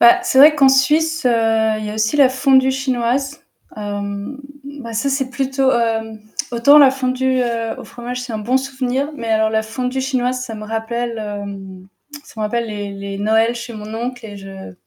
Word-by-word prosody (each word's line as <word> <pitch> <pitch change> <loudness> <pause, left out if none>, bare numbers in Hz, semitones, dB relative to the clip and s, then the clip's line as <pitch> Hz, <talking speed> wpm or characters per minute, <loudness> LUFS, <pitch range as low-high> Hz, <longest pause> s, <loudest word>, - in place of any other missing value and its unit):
Bah 360 +1 +7
c'est 365 -8 +1
vrai 300 +2 +9
qu'en 275 -2 +5
Suisse, 305 +3 +2
heu, - - +4 0.5
il 215 - -5
y 210 - -4
a - - -6
aussi 220 +6 0
la 275 -3 +6
fondue 265 0 +3
chinoise. 265 +2 -1 0.4
Hem, 205 +4 -5 0.4
bah 230 -2 -7
ça 230 +6 -1
c'est 270 -1 -1
plutôt, 270 0 0
hem, 225 -2 -1 0.3
autant 280 +6 +6
la 275 -2 +8
fondue, 260 0 0
heu, 230 -1 -2
au - - -8
fromage, 245 +1 -6
c'est 250 - -7
un 220 - -3
bon 245 +5 0
souvenir, 265 +1 -2
mais 230 - -6
alors 220 0 +2
la 220 0 +1
fondue 250 +4 -3
chinoise, 255 -1 -1
ça 230 -3 -6
me 215 - -8
rappelle, 230 +2 -3
hem, 200 -3 -7 0.4
ça - - -16
me - - -1
rappelle 235 +2 -1
les 205 -1 -5
les 195 0 -6
Noëls 220 +3 +2
chez 235 0 -7
mon 215 0 -8
oncle 245 +1 -5
et 205 -1 -9
je 195 - -10
240 Hz, 200 wpm, -18 LUFS, 220-265 Hz, 0.5 s, vrai